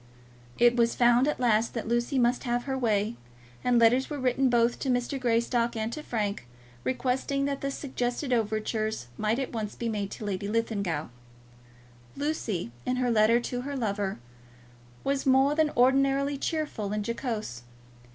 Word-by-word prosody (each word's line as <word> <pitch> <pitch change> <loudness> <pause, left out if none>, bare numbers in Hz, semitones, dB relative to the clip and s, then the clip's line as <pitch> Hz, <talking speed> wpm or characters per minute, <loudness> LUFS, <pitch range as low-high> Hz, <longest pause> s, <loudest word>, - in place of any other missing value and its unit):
It 240 0 +5
was 235 -1 +2
found 240 +2 +4
at 300 - -1
last 230 -2 +2
that 230 - -3
Lucy 240 +4 0
must 245 0 +2
have 240 0 0
her 270 0 -2
way, 220 -3 0 0.5
and 250 -1 +3
letters 240 +3 +4
were 295 - -4
written 260 0 +2
both 240 0 +2
to 270 - -2
Mrs. 250 +2 0
Greystock 235 0 +1
and 220 +1 -2
to 305 - -5
Frank, 210 - -3 0.4
requesting 265 +2 0
that 280 -1 -2
the 275 - -1
suggested 255 -1 -2
overtures 215 - -1
might 215 - 0
at 265 -2 -3
once 215 -2 -4
be 235 - -3
made 205 -3 -2
to 215 - -7
Lady 200 -1 -3
Linlithgow. 200 -8 -1 1.1
Lucy, 235 - -2
in 255 - 0
her 250 -1 +1
letter 225 +1 +4
to 245 +1 -3
her 280 +2 -5
lover, 200 -4 -1 0.9
was 275 0 -1
more 265 +2 +5
than 310 0 +2
ordinarily 275 +2 +3
cheerful 275 -9 -2
and 210 -1 -2
jocose. 225 - -3
240 Hz, 160 wpm, -28 LUFS, 220-265 Hz, 1.1 s, It